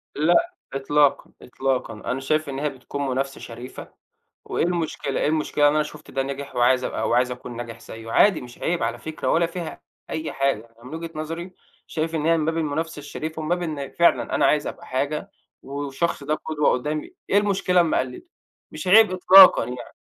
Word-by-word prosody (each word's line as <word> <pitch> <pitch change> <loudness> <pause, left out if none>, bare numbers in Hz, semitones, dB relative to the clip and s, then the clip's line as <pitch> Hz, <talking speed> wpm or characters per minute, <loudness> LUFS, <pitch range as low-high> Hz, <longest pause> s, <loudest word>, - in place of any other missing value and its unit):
لأ، 175 - +3 0.2
إطلاقًا، 145 +1 +2
إطلاقًا. 130 -2 -2
أنا 115 +4 -4
شايف 155 +2 0
إن 135 0 -4
هي 150 - 0
بتكون 140 +1 -5
منافسة 135 +1 -2
شريفة، 120 +2 -9 0.5
وإيه - - -1
المشكلة 165 -5 -2
إيه - - +2
المشكلة 150 -1 +2
إن 145 - +3
أنا 155 - +3
شُفت 150 0 -11
ده 135 - -1
نجِح، 140 +1 -6
وعايز 125 +1 +3
أبقى - - -2
وعاوز 125 +1 +2
أكون 125 -1 -7
ناجح 120 -1 -7
زَيّه؟ 115 0 -9
عادي 200 -5 +4
مش 120 -1 -11
عيب 170 -6 -1
على 115 +1 -1
فكرة، 155 0 -5
ولا 170 +1 +3
فيها 170 0 -6 0.3
أي 155 0 -3
حاجة، 135 -5 0 0.2
يعني 115 - -19
من 160 - -6
وجهة 165 0 -6
نظري 165 +4 -5 0.3
شايف 165 +1 -2
إن 155 -1 -1
هي 165 0 +4
من 155 - 0
باب 160 +1 -1
المنافسة 160 0 -2
الشريفة، 155 +2 -6
ومن 155 - -4
باب 175 0 +1
إن 150 -5 -4
فعلًا 170 - +2
أنا - - +3
عايز 150 -1 +2
أبقى - - -8
حاجة 150 +9 -2 0.3
والشخص 140 +3 -3
ده 150 +2 0
قدوة 150 -2 0
قدّامي، 150 +4 -2 0.2
إيه 200 - +4
المشكلة 195 -3 +3
لمّا 165 - +1
أقلده؟ 130 - -3 0.5
مش 185 - -7
عيب 215 +1 +7
إطلاقًا 185 -6 +8
يعني. 125 +1 -8
150 Hz, 195 wpm, -23 LUFS, 135-165 Hz, 0.5 s, إطلاقًا